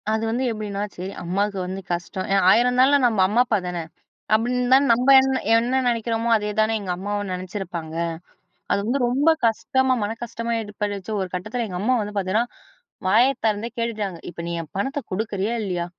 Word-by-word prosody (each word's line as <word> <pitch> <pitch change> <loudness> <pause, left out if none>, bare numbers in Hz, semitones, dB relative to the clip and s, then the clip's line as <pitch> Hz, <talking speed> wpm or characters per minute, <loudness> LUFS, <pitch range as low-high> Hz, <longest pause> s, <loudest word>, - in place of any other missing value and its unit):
அது 220 +1 0
வந்து 240 +3 -1
எப்டின்னா, 205 -2 -4
சரி 185 +2 -5
அம்மாவுக்கு 200 +3 -1
வந்து 190 +1 -5
கஷ்டம், 175 +2 -3
ஏன் 195 - +3
ஆயிரம்ன்னாளும் 250 +5 +4
நம்ம 225 -4 +2
அம்மா 220 +5 +3
அப்பா 225 -3 +1
தானே! 175 -2 -3 0.5
அப்டின்னு 245 +3 +1
தான் 275 +1 +5
நம்ப 250 +3 +1
என்ன 265 0 +1 0.2
என்ன 245 +3 +2
நெனைக்கிறோமோ, 230 -1 0
அதே 210 -1 -2
தானே 215 +1 +2
எங்க 195 -3 -5
அம்மாவும் 205 +1 -3
நெனைச்சிருப்பாங்க. 180 -3 -5 0.8
அது - - +3
வந்து 250 +5 0
ரொம்ப 275 +6 +3 0.2
கஷ்டமா, 260 +3 +1
மன 205 +2 -2
கஷ்டமா 235 0 -3
ஏற்பட்டுச்சு 205 -1 -4
ஒரு 190 - -2
கட்டத்தில 215 +7 -3
எங்க 180 -3 -5
அம்மா 245 +5 +2
வந்து 210 0 -6
பாத்தீங்கன்னா, 200 +4 +1 0.6
வாய 220 +6 +5 0.2
திறந்தே 215 +1 0
கேட்டுட்டாங்க, 215 -6 -2
"இப்ப 175 - -11
நீ - - -3
என் 160 - -12
பணத்தை 270 +8 -2
குடுக்குறியா 205 +2 -2
இல்லையா?" 180 -3 -2
215 Hz, 175 wpm, -23 LUFS, 195-240 Hz, 0.8 s, தான்